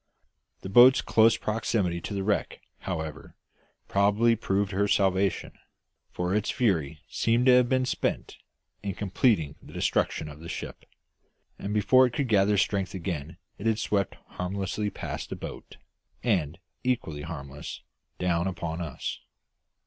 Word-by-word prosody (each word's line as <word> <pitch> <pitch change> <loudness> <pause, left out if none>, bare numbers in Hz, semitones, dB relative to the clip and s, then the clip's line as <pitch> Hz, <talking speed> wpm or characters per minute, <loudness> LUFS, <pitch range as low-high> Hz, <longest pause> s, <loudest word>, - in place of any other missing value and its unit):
The 95 - -6
boat's 125 +6 +8
close 115 +1 +4
proximity 105 -5 -1
to 100 - -5
the 100 - -1
wreck, 105 +1 -1 0.2
however, 80 -4 -5 0.5
probably 105 +4 +3
proved 100 -2 0
her 100 +1 +1
salvation, 95 -1 +1 0.6
for 90 +1 -2
its 105 0 0
fury 80 - 0
seemed 115 +2 +1
to 130 - +7
have 125 -1 +5
been 130 -1 +2
spent - - -2 0.4
in 100 -3 -4
completing 95 - +1
the - - -14
destruction 80 - 0
of 75 0 -10
the 85 +1 -9
ship, - - -6 0.7
and 100 - -4
before 130 +5 +5
it 120 - -7
could 130 0 -1
gather 100 -1 +4
strength 100 -1 0
again 85 -2 -4 0.2
it 105 - -2
had 110 -1 +2
swept 100 -3 0
harmlessly 100 +3 -3
past - - -6
the - - -4
boat - - -9 0.5
and, 85 -10 +1 0.3
equally 115 - -1
harmlessly, 75 -3 -7 0.3
down 85 0 0
upon 85 -2 -4
us. 80 -5 -4
100 Hz, 140 wpm, -27 LUFS, 85-110 Hz, 0.7 s, boat's